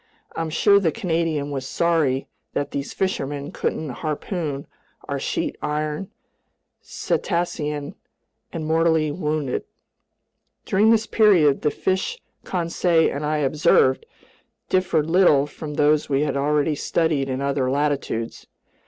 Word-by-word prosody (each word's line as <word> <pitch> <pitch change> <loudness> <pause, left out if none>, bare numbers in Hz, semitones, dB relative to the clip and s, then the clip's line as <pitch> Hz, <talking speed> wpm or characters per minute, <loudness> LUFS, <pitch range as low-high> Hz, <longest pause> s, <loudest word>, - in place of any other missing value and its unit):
I'm 165 -1 -2
sure 200 +6 +4
the 170 -5 +1
Canadian 160 -4 -1
was 135 -2 -4
sorry 155 -6 +1 0.3
that 140 0 -2
these 140 0 -4
fishermen 145 -6 -2
couldn't 155 - -2
harpoon 155 -2 -3 0.4
our - - -2
sheet - - -2
iron 150 +4 -2 0.7
cetacean 150 -3 -2 0.6
and 160 -2 -4
mortally 160 -1 +2
wound 150 -3 -2
it. - - -3 1.0
During 205 +3 +3
this 225 -1 +4
period 185 -12 +4
the 150 - +2
fish 190 - -1 0.3
Conseil 170 -2 +1
and 145 - -4
I 150 +1 0
observed 130 -2 +3 0.6
differed 175 -5 +1
little 165 -5 +4
from 150 0 -8
those 150 +1 +2
we 135 0 +2
had 145 -3 -1
already 150 +2 +1
studied 150 -2 0
in 130 0 -2
other 140 -2 0
latitudes. 140 -5 -2
155 Hz, 125 wpm, -23 LUFS, 145-170 Hz, 1.0 s, sure